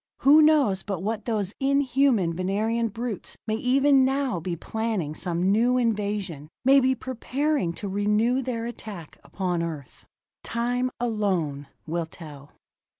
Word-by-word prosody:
Who 295 +3 +7
knows 290 -11 +4
but 195 -4 -4
what 220 0 -3
those 210 -4 -1
inhuman 270 -8 +2
Venerian 215 +6 0
brutes 225 -1 -5
may 215 - -1
even 270 +3 +4
now 265 -6 0
be 170 +1 -3
planning 215 -5 -3
some 175 +3 0
new 240 +4 +3
invasion, 205 - -2 0.2
may 275 +1 +7
be 260 0 +2
preparing 260 - -1
to 200 - -6
renew 210 +6 +1
their 235 -3 -3
attack 210 -8 -8
upon 180 -3 -2
Earth? 155 -6 -7 0.4
Time 245 +2 -1
alone 185 - -1 0.2
will 165 +1 -2
tell. 150 -4 -12
220 Hz, 135 wpm, -25 LUFS, 180-250 Hz, 0.4 s, Who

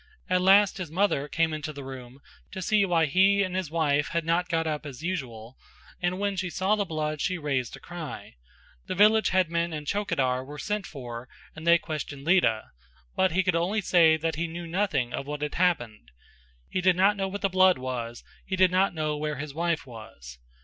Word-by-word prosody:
At 180 0 +3
last 195 +2 +5
his 180 -4 -5
mother 165 -4 +1
came 165 +1 0
into 155 0 -4
the 140 -2 -9
room 130 0 -10 0.3
to 190 - -5
see 210 +2 +3
why 170 -3 +2
he 195 +6 +4
and 185 -1 -3
his 185 -5 -2
wife 150 -3 +1
had 170 -1 -2
not 175 +2 +1
got 165 -1 0
up 155 -1 -2
as 145 -1 -9
usual 130 -9 -5 0.4
and 175 +1 0
when 200 0 -1
she 185 -1 -2
saw 190 +4 +1
the 205 -1 -1
blood 155 -3 -3
she 185 -1 0
raised 135 -7 -2
a - - -13
cry; 175 -4 -8 0.5
the - - -3
village 215 +3 +5
headman 170 -2 +1
and 150 -1 -5
chowkidar 135 -10 0
were 145 +3 -9
sent 210 +4 -3
for 125 -3 -8 0.3
and 160 +1 -8
they 170 0 +7
questioned 150 -4 -6
Lita, 165 -12 +2 0.4
but 190 -3 +2
he 190 +2 +2
could 185 -3 +1
only 180 +6 +1
say 170 -5 +4
that 160 0 -2
he 170 +1 -1
knew 170 +1 -7
nothing 165 -8 -1
of 140 - -4
what 150 0 -4
had 150 - -3
happened; 120 - 0 0.6
he 185 - -2
did 185 0 +4
not 195 +3 +4
know 195 -1 -2
what 200 +1 -6
the 200 - +2
blood 185 0 +4
was, 120 -2 -5 0.2
he 190 - -3
did 185 -1 +4
not 185 0 +2
know 155 -1 -1
where 150 0 -3
his 145 +1 -6
wife 170 -2 -1
was. 85 - -11
165 Hz, 210 wpm, -27 LUFS, 145-185 Hz, 0.6 s, they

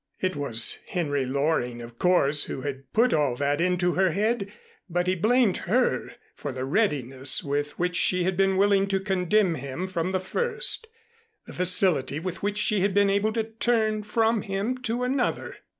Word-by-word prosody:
It 185 -3 -1
was 120 -6 0
Henry 145 -6 -1
Loring, 135 -3 -1
of 115 0 -11
course, 155 -5 +3
who 130 - -5
had 135 -1 -6
put 240 +3 +3
all 145 -5 +1
that 145 +4 0
into 180 0 +1
her 185 -3 +2
head, 205 +1 -1 0.4
but 175 +1 0
he 185 - +1
blamed 215 +3 +2
her 245 +1 +1 0.2
for 145 - -6
the 130 0 -4
readiness 135 - 0
with 145 +1 -2
which 180 0 -1
she 180 -1 +1
had 185 +1 0
been 195 0 +2
willing 200 0 +3
to 195 -1 0
condemn 190 0 +1
him 140 +5 -5
from 185 -1 -2
the 190 - 0
first, 470 - -1 0.6
the - - -11
facility 180 -6 +2
with 185 +2 -5
which 205 +1 -2
she 210 -1 +1
had 195 +1 0
been 200 -1 +4
able 200 +2 +1
to 225 -1 0
turn 220 -1 0
from 225 +1 +1
him 200 +6 -2
to 245 0 -2
another. 255 0 -1
185 Hz, 180 wpm, -26 LUFS, 145-210 Hz, 0.6 s, been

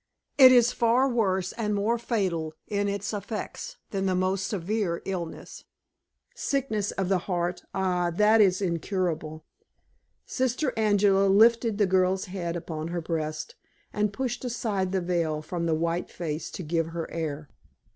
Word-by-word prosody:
It 260 -1 +10
is 245 -1 +5
far 240 +3 +3
worse 190 -7 0
and 210 -2 -2
more 220 +4 +1
fatal 180 -9 -1
in 205 -1 0
its 200 +1 -3
effects 220 - -5
than 195 -1 -1
the 185 - +1
most 185 +1 0
severe 195 -2 -2
illness. 175 -4 -6 0.7
Sickness 220 -8 -1
of 195 -2 -2
the 190 -1 +2
heart 175 0 -1
ah, 180 -2 +1
that 210 +5 +4
is 190 -1 +3
incurable!" 165 -3 -2 0.8
Sister 260 +1 -1
Angela 205 -2 +3
lifted 225 +2 +4
the 210 - +4
girl's 185 0 +2
head 180 -3 -4
upon 160 -2 -5
her 175 +1 -3
breast, 160 - -3 0.4
and 210 -1 0
pushed 245 +3 -3
aside 210 -6 -2
the 190 -1 0
veil 170 -3 0
from 170 +1 -3
the 160 - +2
white 170 +2 -1
face 160 -2 -4
to 185 - -7
give 165 +1 0
her 165 0 -4
air. 155 -3 -4
190 Hz, 150 wpm, -27 LUFS, 170-215 Hz, 0.8 s, It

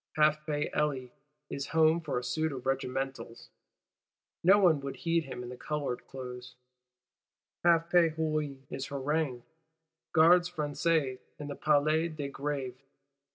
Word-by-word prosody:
Half 155 0 +3
pay 145 -1 -1
Elie 135 -4 -1 0.4
is 140 0 -4
home 160 +1 +5
for 160 - -2
a 125 - -2
suit 155 +5 -1
of 130 -2 -7
regimentals; 135 -2 -3 0.9
no 190 +4 +7
one 175 -7 +4
would 140 -1 -5
heed 165 -1 0
him 125 - -6
in 125 +1 -7
coloured 145 -5 -3
clothes: 125 -1 -8 1.1
half 170 -1 +4
pay 175 -2 +5
Hulin 155 -3 -2
is 135 0 -4
haranguing 140 -2 -1 0.7
Gardes 175 +2 +6
Françaises 150 -4 0 0.2
in 145 -1 -7
the 145 - -4
Place 155 +2 +2
de 140 -2 -4
Grève. 135 -3 -3
150 Hz, 135 wpm, -30 LUFS, 135-160 Hz, 1.1 s, no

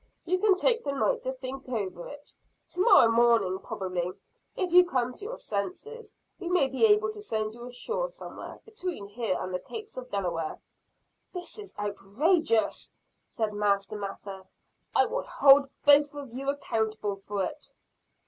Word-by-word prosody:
You 365 +2 +1
can 400 -1 +4
take 470 +5 +2
the 280 - -2
night 275 - +1
to 260 - -2
think 260 0 -7
over 190 -7 -3
it. 290 0 -12 0.4
To 360 - -2
morrow 370 - +7
morning 230 -5 +3
probably, 185 -2 -3 0.4
if 365 -3 -2
you 360 0 +9
come 255 -8 -1
to 400 - -11
your 480 - -5
senses, 400 - -5 0.2
we 350 - -4
may 355 -6 +4
be 270 +11 +3
able 425 +1 +3
to 425 -1 -9
send 215 - -2
you 240 +1 -9
ashore 470 - -3
somewhere, - - -9
between 365 - -5
here 210 -3 -1
and 185 - -4
the 180 - -1
capes 435 - -8
of 255 - -5
the 250 - -25
Delaware." 170 -4 -2 0.8
"This 360 +3 -7
is 410 - -9
outrageous!" 225 - +1 0.4
said 220 -2 -2
Master 200 0 0
Mather. 195 -1 -7 0.5
"I - - +6
will - - -2
hold 275 0 +5 0.2
both 290 0 +6
of 280 -5 -8
you 270 +2 -3
accountable 220 -7 -2
for 195 0 -3
it." - - -8
255 Hz, 165 wpm, -28 LUFS, -, 0.8 s, you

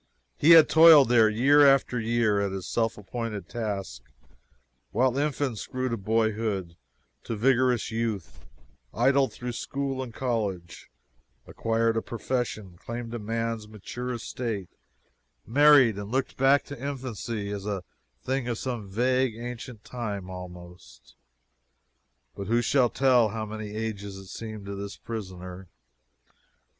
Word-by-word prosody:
He 155 - +2
had 160 -2 +9
toiled 160 -5 +8
there 115 -3 +5
year 135 +7 +5
after 135 -3 +4
year, 110 -2 +1
at 100 -1 -1
his 95 -1 -5
self 115 -1 -1
appointed 105 -2 -5
task, 100 - -4 0.9
while 130 0 +1
infants 140 -6 -1
grew 130 0 -2
to 115 - -1
boyhood 110 -4 -1 0.5
to 115 - -3
vigorous 125 0 +2
youth 110 - -4 0.5
idled 135 +3 +3
through 125 0 -6
school 135 +2 -3
and 130 -3 -6
college 105 -9 -3 0.6
acquired 115 0 0
a - - +1
profession 110 -7 -4
claimed 115 0 -6
man's 115 0 -3
mature 115 +4 -6
estate 115 -5 -4 0.8
married 135 -4 +5
and 100 0 -6
looked 130 +1 -1
back 135 +2 +4
to 140 -3 -9
infancy 120 -6 -4
as 100 -1 -5
to - - -2
a 95 -3 -4 0.4
thing 130 -1 -1
of 120 -2 -2
some 120 -6 -4
vague, 125 +3 +1
ancient 120 -1 -7
time, 105 -6 -5
almost. 90 -1 -11 1.2
But 100 - -6
who 120 +2 +2
shall 125 0 +3
tell 125 -4 +3
how 110 +1 -4
many 110 0 -6
ages 100 -3 -4
it 95 -1 -11
seemed 110 -2 -7
to 100 - -5
this 100 0 -6
prisoner? 95 -4 -7
115 Hz, 135 wpm, -27 LUFS, 100-125 Hz, 1.2 s, had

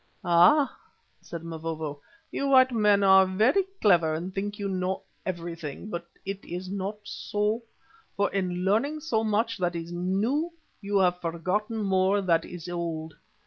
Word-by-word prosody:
"Ah!" 175 - +5 0.5
said 170 -1 -8
Mavovo, 160 -3 -5 0.3
"you 280 - -1
white 260 -1 +6
men 210 -3 +3
are 190 -1 +7
very 220 - +3 0.2
clever 170 -6 +4
and 175 +4 -5
think 205 +1 -2
that - - -17
you 200 - -2
know 185 0 -2 0.2
everything. 170 0 -5
But 170 -1 -5 0.2
it 195 0 -5
is 180 +2 -6
not 200 +1 -3
so, 210 +2 -2 0.6
for 200 -1 +1
in 180 -2 -1
learning 280 +10 +1
so 230 -8 0
much 220 +1 0
that 175 -1 0
is 165 0 -5
new, 210 - 0 0.3
you 200 0 0
have 180 -2 +2
forgotten 195 +7 -2
more 190 +1 +2
that 170 -4 +2
is 175 -2 -8
old. 165 -2 -4
190 Hz, 155 wpm, -27 LUFS, 170-210 Hz, 0.6 s, are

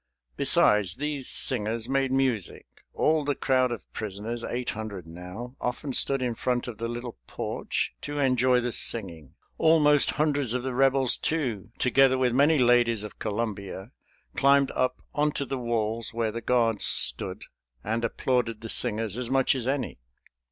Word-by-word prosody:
Besides, 100 +2 +3
these 145 -2 -4
singers 115 -2 +1
made 135 0 0
music. 130 -7 -1 0.3
All 155 -1 +1
the 145 0 -1
crowd 130 -2 +1
of 120 - -6
prisoners, 110 +3 -5
eight 120 0 -3
hundred 105 -5 -7
now, 90 +9 -9
often 125 +3 -3
stood 135 +1 +3
in 120 -2 -1
front 125 +2 -2
of 115 -3 -8
the 115 - -2
little 120 - -7
porch - - -3
to 145 0 -5
enjoy 130 -2 +2
the 120 0 -2
singing. 85 - -1 0.2
Almost 150 -2 +4
hundreds 145 -5 +1
of 125 - -2
the 130 -1 -3
Rebels, 135 -1 +3
too, 125 -11 -2
together 130 +1 +3
with 125 -2 +1
many 145 +5 +4
ladies 120 -3 +3
of 105 - -10
Columbia, 105 -1 -4 0.4
climbed 140 0 +3
up 130 - -2
onto 150 -1 0
the 135 0 -4
walls, 115 -1 -2
where 115 -2 -1
the 115 +2 -6
guards 115 -3 +1
stood, - - +2 0.4
and 115 +2 -2
applauded 115 -1 -1
the 115 - -7
singers 110 +1 +1
as 125 -2 -3
much 135 0 +2
as 130 -3 -3
any. 135 - -2
120 Hz, 160 wpm, -26 LUFS, 110-135 Hz, 0.4 s, Almost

